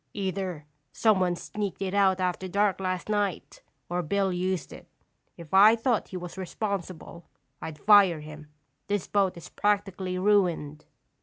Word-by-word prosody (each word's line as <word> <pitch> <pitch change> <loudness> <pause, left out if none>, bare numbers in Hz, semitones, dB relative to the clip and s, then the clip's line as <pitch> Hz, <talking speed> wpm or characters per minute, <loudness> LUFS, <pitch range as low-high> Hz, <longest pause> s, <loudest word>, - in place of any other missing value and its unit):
Either 190 -5 -3 0.3
someone 185 -5 +2
sneaked 205 +2 -5
it 195 -1 -3
out 195 -2 +3
after 185 0 -2
dark 200 +1 +1
last 185 -2 -3
night, 205 -4 -2 0.3
or 175 +1 -1
Bill 190 +3 0
used 185 -1 -2
it. - - -13 0.5
If 170 -1 -12
I 210 +4 +8
thought 230 0 0
he 185 - -6
was 180 +1 -8
responsible, 185 -3 -5 0.4
I'd 160 -2 -6
fire 195 -4 +5
him. 155 0 -11 0.4
This 205 -2 -1
boat 195 -3 0
is 170 - -10
practically 195 -3 -1
ruined." 180 -7 +1
190 Hz, 145 wpm, -27 LUFS, 175-200 Hz, 0.5 s, I